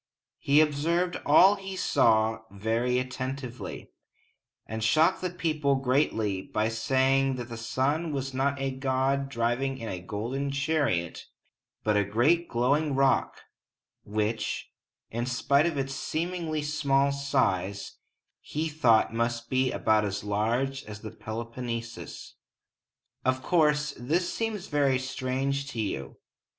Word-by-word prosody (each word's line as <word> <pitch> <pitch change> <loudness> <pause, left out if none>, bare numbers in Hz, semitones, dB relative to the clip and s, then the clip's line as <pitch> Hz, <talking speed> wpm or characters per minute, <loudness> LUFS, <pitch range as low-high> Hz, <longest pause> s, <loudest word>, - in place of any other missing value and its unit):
He 145 +2 +4
observed 165 +4 +1
all 190 +7 +7
he 195 -1 -6
saw 110 -9 +3
very 115 +5 0
attentively, 130 -3 -5 0.7
and 110 +1 -4
shocked 155 +8 +3
the 185 - -1
people 155 -5 0
greatly 125 -7 +1
by 110 +3 -1
saying 130 +3 +2
that 120 -1 -6
the 115 - -6
sun 140 +8 -1
was 135 -2 -3
not 140 +2 0
a 135 0 -1
god 135 +1 0
driving 125 +2 -1
in 115 -3 -6
a 90 - -5
golden 115 +9 -3
chariot, 140 - -1 0.6
but 105 -1 +2
a 105 - +3
great 135 - +2
glowing 140 +5 +1
rock, 135 0 +2 0.6
which, 105 +1 -2 0.4
in 120 +2 -2
spite 140 +4 +2
of 165 -4 -2
its 135 0 -2
seemingly 160 +1 -2
small 140 -2 +2
size, 100 -9 -1 0.4
he 160 +2 -3
thought 120 -8 +3
must 115 0 -2
be 130 -1 +2
about 110 -1 +2
as 100 0 -3
large 115 +7 0
as 105 -1 -9
the 110 - -7
Peloponnesus. 115 +1 -6 0.9
Of 130 0 0
course, 150 -2 +2
this 165 +9 0
seems 220 -4 -2
very 140 -5 +2
strange 135 +1 -2
to 115 - -5
you. 95 -11 -3
130 Hz, 130 wpm, -28 LUFS, 115-145 Hz, 0.9 s, all